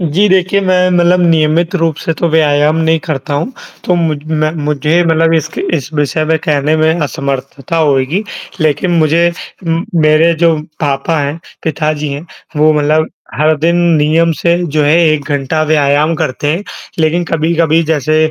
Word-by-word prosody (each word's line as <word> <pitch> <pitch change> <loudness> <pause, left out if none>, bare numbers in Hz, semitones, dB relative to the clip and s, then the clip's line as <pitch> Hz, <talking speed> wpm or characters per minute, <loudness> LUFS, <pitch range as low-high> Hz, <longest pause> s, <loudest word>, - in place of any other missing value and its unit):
जी 175 +5 +1
देखिए, 190 +1 +2
मैं 185 -1 +2
मतलब 175 0 +3
नियमित 165 +2 +1
रूप 165 -3 0
से 165 - 0
तो 170 - +1
व्यायाम 150 -1 +2
नहीं 160 0 +1
करता 145 -3 -3
हूँ 160 - -2 0.3
तो 180 - +1
मुझ 160 -3 0
मैं 155 -1 0
मुझे 150 +3 +1
मतलब 165 0 +2
इसके 160 - -2 0.2
इस 140 0 -6
विषय 150 +1 0
में 160 +1 +1
कहने 150 +1 +1
में 160 +2 +1
असमर्थता 140 +1 -4
होएगी। 150 +3 +1 0.4
लेकिन 155 +3 0
मुझे 165 +2 +3 0.4
उम, 165 +2 -1
मेरे 155 +1 +3
जो 165 -1 +4 0.2
पापा 145 +3 -1
हैं, 145 +3 -3 0.2
पिताजी 150 -1 -2
हैं, 145 +5 -7 0.3
वो 155 +1 +4
मतलब 155 +1 +1 0.3
हर 155 +4 +2
दिन 165 +3 +1 0.2
नियम 160 +3 +2
से 170 0 +2
जो 155 -1 0
है 150 +3 +3
1 155 -2 0
घंटा 145 +3 -1
व्यायाम 150 +2 +2
करते 145 -2 -3
हैं। 175 +5 -3 0.4
लेकिन 165 +2 +1
कभी-कभी 165 0 +1
जैसे 155 +2 +1
155 Hz, 165 wpm, -13 LUFS, 150-165 Hz, 0.4 s, जो